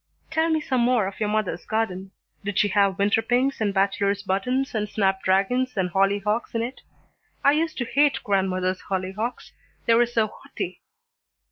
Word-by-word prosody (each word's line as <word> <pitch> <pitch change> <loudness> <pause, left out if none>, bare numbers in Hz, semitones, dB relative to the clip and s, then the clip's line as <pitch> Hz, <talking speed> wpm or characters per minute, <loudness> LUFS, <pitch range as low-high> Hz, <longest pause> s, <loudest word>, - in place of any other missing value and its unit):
"Tell 320 +1 +2
me 320 -1 +2
some 260 -4 0
more 240 -3 +3
of 195 - -6
your 210 -1 0
mother's 210 -5 -1
garden. 195 -4 -2 0.3
Did 205 -1 -3
she 205 - +3
have 200 -1 +2
winter 205 +2 +3
pinks 250 +3 +1
and 205 -2 +2
bachelor's 200 0 +1
buttons 250 +8 -1
and 210 -2 -1
snap 195 -2 +1
dragons 210 +7 +1
and 180 -2 0
hollyhocks 200 +5 +1
in 230 - +1
it? 245 +3 -6 0.6
I 280 - +6
used 315 +2 0
to 240 - -1
hate 285 +4 +3
grandmother's 185 -2 0
hollyhocks. 195 +5 -3 0.3
They 230 - +4
were 240 +1 +4
so 230 -2 +1
haughty." 215 - -7
210 Hz, 170 wpm, -24 LUFS, 195-245 Hz, 0.6 s, I